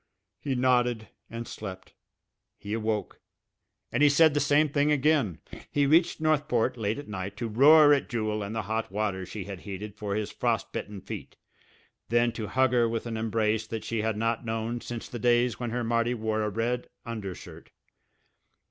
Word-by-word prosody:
He 135 -3 -2
nodded 125 -3 +2 0.2
and 115 0 -6
slept. 95 -3 -8 0.6
He 105 +1 -6
awoke 110 -3 -2 0.7
and - - 0
he 150 - +7
said 155 +1 +5
the 145 - +2
same 145 +2 +3
thing 145 +1 +1
again. 140 - +2 0.3
He 145 -1 +2
reached 165 +5 +3
Northport, 150 -6 +1
late 110 -1 -2
at 145 - -8
night, 100 -1 -5
to 120 - -3
roar 145 +6 +7
at 140 - 0
Jewel 110 -3 -1
and 100 +2 -5
the 110 - -1
hot 110 +1 -3
water 100 -3 -2
she 100 +1 -6
had 100 -1 -7
heated 100 +2 -7
for 105 -2 -3
his 105 -1 -2
frost 115 -4 -1
bitten 105 -2 -5
feet - - -8 0.7
then 120 0 +3
to 110 -2 -5
hug 130 +2 +2
her 120 -2 +3
with 115 0 -3
an 115 -1 -4
embrace 110 -1 0
that 110 -1 -5
she 115 -2 -2
had 110 -1 -1
not 115 +2 0
known 115 +1 -3
since 120 -1 -6
the 120 - -7
days 120 +1 +2
when 120 -1 -3
her 120 +1 -2
Marty 115 +1 +1
wore 110 -1 -1
a 105 - 0
red 115 +4 -2 0.2
undershirt. 105 -6 -7
115 Hz, 185 wpm, -28 LUFS, 105-125 Hz, 0.7 s, he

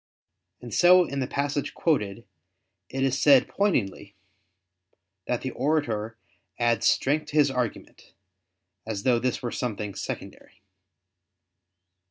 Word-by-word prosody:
And 120 -2 -9
so 180 0 +6
in 140 -3 -4
the 130 - -1
passage 145 +1 -2
quoted, 115 - -1 0.6
it 135 0 -2
is 135 0 0
said 140 -3 +6
pointedly 105 - -1 1.1
that 125 - -1
the 130 - -4
orator 120 -6 -1 0.4
"adds 120 -1 +2
strength 150 +3 +1
to - - -8
his 145 -2 +4
argument," 125 -4 -5 0.7
as 105 -3 -5
though 125 -2 +3
this 125 +1 -2
were 120 - -2
something 105 -4 -4
secondary. - - -8
130 Hz, 120 wpm, -26 LUFS, 115-145 Hz, 1.1 s, so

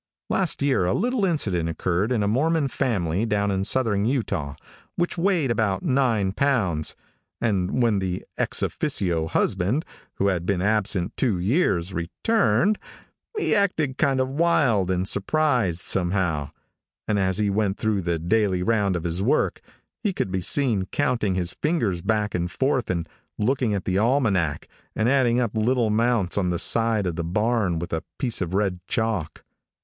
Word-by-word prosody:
Last 180 -7 0
year, 135 -10 +2
a 90 - +1
little 240 -1 +1
incident 100 - 0
occurred 90 +6 -1
in 115 -4 +1
a - - +1
Mormon 145 +6 +1
family 95 -7 -1
down 100 -2 0
in 95 0 0
southern 105 -2 +1
Utah, 100 - -1 0.4
which 175 0 -1
weighed 170 -7 +1
about 110 - 0
nine 125 - +1
pounds, 95 - 0 0.4
and 100 +1 0
when 110 -4 +2
the 90 -1 -3
ex - - 0
officio 85 -5 -1
husband, 105 - 0 0.3
who 100 - +1
had 90 -2 -2
been 100 -3 +1
absent 100 -2 0
two 115 -8 +1
years, 95 - +1
returned, 165 - +1 0.6
he 425 - +1
acted 160 -10 0
kind 135 -3 +2
of 130 - +1
wild 135 - +2
and 95 0 0
surprised, 115 - +1
somehow, 90 -6 -1 0.6
and 105 -1 +1
as 95 -1 0
he 105 -1 +1
went 100 -1 0
through 110 -3 0
the 85 -1 -1
daily 95 +1 +1
round 105 -3 +1
of 85 - -3
his 85 +1 -2
work 135 +9 +1 0.4
he 205 -3 0
could 95 - -2
be 95 -1 -1
seen 110 -3 +1
counting 120 -8 0
his 90 -1 -1
fingers 115 - 0
back 105 +1 0
and 90 0 -1
forth 130 - 0
and 85 -2 -2 0.3
looking 120 -1 +1
at 95 - -4
the 95 0 +1
almanac, 105 - +1 0.3
and 110 - +1
adding 125 -2 +3
up 120 -3 -1
little 120 +2 +2
amounts 110 -3 +1
on 90 -2 0
the 90 - 0
side 115 +1 +2
of 85 -3 -3
the 85 - -2
barn 105 0 0
with 85 +1 -5
a 80 0 -2
piece 120 -6 -1
of 90 0 -2
red 95 -3 0
chalk. 110 -8 -2
105 Hz, 165 wpm, -24 LUFS, 90-130 Hz, 0.6 s, adding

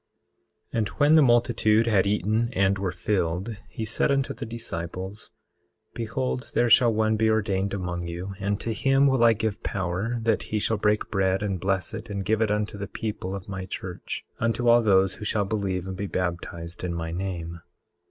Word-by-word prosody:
18:5 - - -1
And 110 - +1
when 145 +6 +3
the 160 - +7
multitude 120 -3 +4
had 100 -4 +3
eaten 110 +3 +1
and 95 -1 +2
were 95 -2 -1
filled, 95 +3 -2
he 110 - -4
said 110 - +2
unto 140 0 +1
the 115 - -7
disciples: 95 -3 -5 0.6
Behold 125 +2 -3
there 120 -1 +3
shall 120 +1 +7
one 110 0 +1
be 110 0 +3
ordained 100 -3 +1
among 90 -3 -3
you, 90 +3 -5
and 100 0 -1
to 115 - -2
him 135 +4 +3
will 130 -3 +3
I 115 -1 +7
give 110 -1 -2
power 95 +4 -2
that 115 - +2
he 110 - 0
shall 110 +1 0
break 105 +1 +1
bread 95 0 +1
and 100 -3 -1
bless 95 0 -1
it 110 +1 -7
and 100 -2 -3
give 110 +1 +1
it 110 - +2
unto 105 -1 -1
the 100 - -4
people 100 -3 -4
of 95 -2 -8
my 95 -1 -5
church, 90 -1 -6
unto 115 +1 0
all 120 0 +7
those 95 -3 +4
who - - -9
shall 105 -1 0
believe 95 -3 -2
and 95 0 -5
be 100 0 -3
baptized 85 -1 -4
in 85 -1 -2
my 80 -1 -3
name. 85 -2 -4
105 Hz, 195 wpm, -26 LUFS, 95-115 Hz, 0.6 s, the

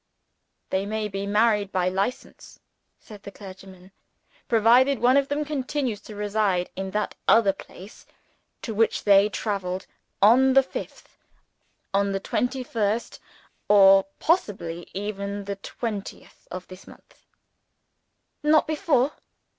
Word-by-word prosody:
"They 190 +1 -1
may 215 0 -2
be 195 0 -5
married 210 -1 +2
by 185 -1 0
License," 195 +7 -5 0.4
said 210 -2 -13
the 200 - -9
clergyman 190 -1 -13 0.6
"provided 245 +4 +4
one 250 +2 +3
of 280 -1 +3
them 290 +1 -2
continues 270 -6 -3
to 215 - -11
reside 205 -3 -1
in 190 0 -4
that 210 +2 -2
other 220 -4 +5
place 195 +1 -14 0.6
to 225 - -4
which 225 +1 +1
they 200 0 +5
traveled 190 -3 -3 0.3
on 255 +6 +5
the 270 0 +6
fifth - - -9 0.7
on 200 0 +1
the 195 - -1
twenty 250 +6 -2
first, 225 -1 -2 0.5
or 195 -1 +6
(possibly) 190 - -1
even 200 0 -4
the 200 0 -4
twentieth 205 0 -7
of 185 0 -7
this 185 0 -13
month." - - -19 1.1
"Not 305 +1 +4
before?" 300 -4 +1
205 Hz, 125 wpm, -24 LUFS, 195-245 Hz, 1.1 s, the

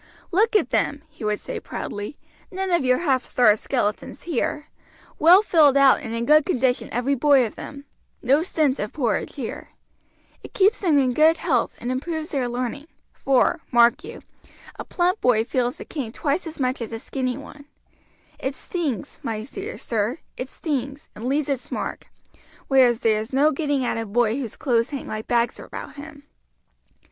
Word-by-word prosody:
"Look 435 +5 +2
at 325 - +2
them!" 290 +1 0
he 300 -6 -12
would 210 -1 0
say - - -6
proudly. 205 +8 -6 0.3
"None 380 0 -3
of 345 -5 +2
your 255 0 +3
half 270 -7 +1
starved 215 -4 +3
skeletons 220 -5 -2
here 300 -3 -2 0.5
well 360 +6 +7
filled 300 -8 +5
out 275 -1 +6
and 225 - -7
in 230 0 -2
good 305 +3 +6
condition 255 -7 0
every 245 +4 0
boy 275 -1 +4
of 220 - -6
them 280 0 -9 0.3
no 275 +5 +3
stint 305 -6 0
of 210 - -4
porridge 245 -8 -1
here. 265 -6 -6 0.7
It - - -13
keeps 405 +4 +3
them 335 -7 +2
in 260 -3 +2
good 315 +4 +5
health - - 0
and 245 - -4
improves 315 +4 -3
their 260 -4 -1
learning; 255 +4 -4 0.3
for, 270 +5 +2
mark 235 -1 +4
you, - - -9 0.6
a - - -3
plump 360 +3 0
boy 235 -3 +3
feels 245 0 -1
the - - -9
cane 265 -8 -5
twice 300 +7 -2
as 315 -1 -9
much 255 -1 -1
as 230 - -5
a 225 - -4
skinny 255 +1 -3
one; 285 0 -12 0.7
it 265 +1 -3
stings, 300 - -4
my 220 -2 -3
dear 390 - -7
sir, 225 +3 -1 0.2
it 255 - -5
stings, 280 -1 -4
and 220 - -8
leaves 280 +3 0
its 275 -3 -3
mark; - - -4 0.6
whereas 250 -4 +4
there 220 -2 +3
is 220 - -8
no 285 +4 +4
getting 285 -3 -1
at 230 - -1
a 225 - -4
boy 225 +1 +1
whose 240 -6 -5
clothes 235 -3 +1
hang 280 -2 -6
like 215 0 -5
bags 240 0 +1
about - - -8
him." 285 0 -11
270 Hz, 180 wpm, -23 LUFS, 240-305 Hz, 0.7 s, well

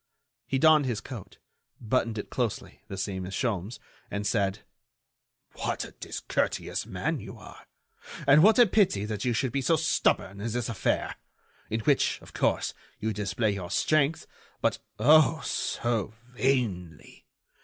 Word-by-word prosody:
He 135 - 0
donned 155 0 +5
his 115 -4 -1
coat, 110 -2 -9 0.4
buttoned 115 -1 0
it 105 - -6
closely, 120 -5 -3
the 95 - -6
same 95 -1 -3
as 95 +1 -5
Sholmes, 110 -3 -2 0.3
and 100 +1 -3
said: 100 -1 0 0.9
"What - - -3
a - - -11
discourteous - - -3
man - - -2
you - - -9
are! - - -13 0.6
And 145 +2 +7
what 215 +4 +6
a 245 - +8
pity 185 - +2
that 105 0 -4
you 125 - +2
should 125 +2 0
be 140 - -1
so 165 +6 +3
stubborn 145 - +1
in 115 +2 -2
this 120 -1 -2
affair, 110 -7 -1 0.5
in 110 +1 -1
which, - - +2
of - - -14
course, - - 0 0.3
you 110 0 -1
display 105 +2 0
your 95 -3 -5
strength, 155 0 +1 0.3
but, - - 0 0.2
oh! 155 +7 +5
so 115 -2 -1 0.2
vainly! 115 - -2
115 Hz, 150 wpm, -28 LUFS, 100-135 Hz, 0.9 s, a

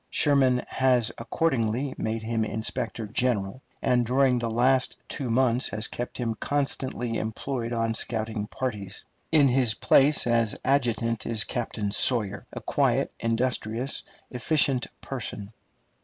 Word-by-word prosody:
Sherman 135 -4 +3
has 125 -3 +2
accordingly 125 0 0
made 110 0 -3
him 115 0 -1
inspector 110 +1 -3
general, 115 0 -1 0.2
and 125 -1 +3
during 125 +1 +2
the 120 -1 -2
last 125 +3 +2
two 135 -6 -4
months 125 +1 +2
has 110 +1 +1
kept 120 - -5
him 115 -2 -1
constantly 130 -3 -2
employed 115 +2 -4
on 115 -1 0
scouting 110 -2 -3
parties. 105 -6 -5 0.3
In 150 -3 +5
his 125 -4 +2
place 140 +6 +4
as 115 -2 +1
adjutant 115 -4 0
is 110 -2 +2
Captain 110 -4 -3
Sawyer, 105 -3 +2
a - - -7
quiet, - - +1
industrious, 115 +1 -1 0.3
efficient 130 0 +1
person. 110 -5 -6
120 Hz, 125 wpm, -26 LUFS, 110-130 Hz, 0.3 s, In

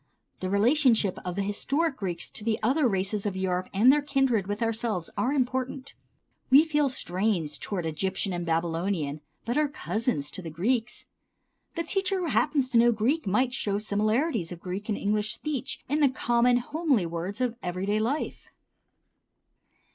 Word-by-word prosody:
The 185 - -3
relationship 225 -1 +3
of 180 -1 -4
the 200 - -1
historic 275 +10 0
Greeks 175 -4 -3
to - - -10
the 220 0 0
other 265 +5 +3
races 200 0 -1
of 195 - -3
Europe 185 -1 -1
and 230 +7 +6
their 295 - +2
kindred 270 -8 +1
with 205 +3 -2
ourselves 225 -6 -2
are 255 - 0
important. 260 0 -2 0.6
We 275 +4 +8
feel 300 -3 +1
strange 180 - -1
toward 185 -5 -3
Egyptian 190 +4 -2
and 175 0 -3
Babylonian, 165 -2 -1 0.2
but 240 +5 0
are 305 - +3
cousins 215 - -2
to - - -4
the 165 - -6
Greeks. 225 +9 -1 0.7
The 335 - -1
teacher 385 +3 0
who - - -1
happens 280 -3 +1
to 235 - +5
know 240 +1 +6
Greek 235 +6 0
might 245 +6 +2
show 210 -5 -1
the 205 - -1
similarities 215 - 0
of 175 - -7
Greek 190 +5 -6
and 210 - 0
English 210 +1 0
speech 295 -5 -4
in 290 +3 0
the 285 -3 +5
common 245 -1 +2
homely 275 - 0
words 170 +5 -4
of 250 -2 0
everyday 190 +4 -1
life. 250 +8 -2
215 Hz, 170 wpm, -27 LUFS, 190-260 Hz, 0.7 s, We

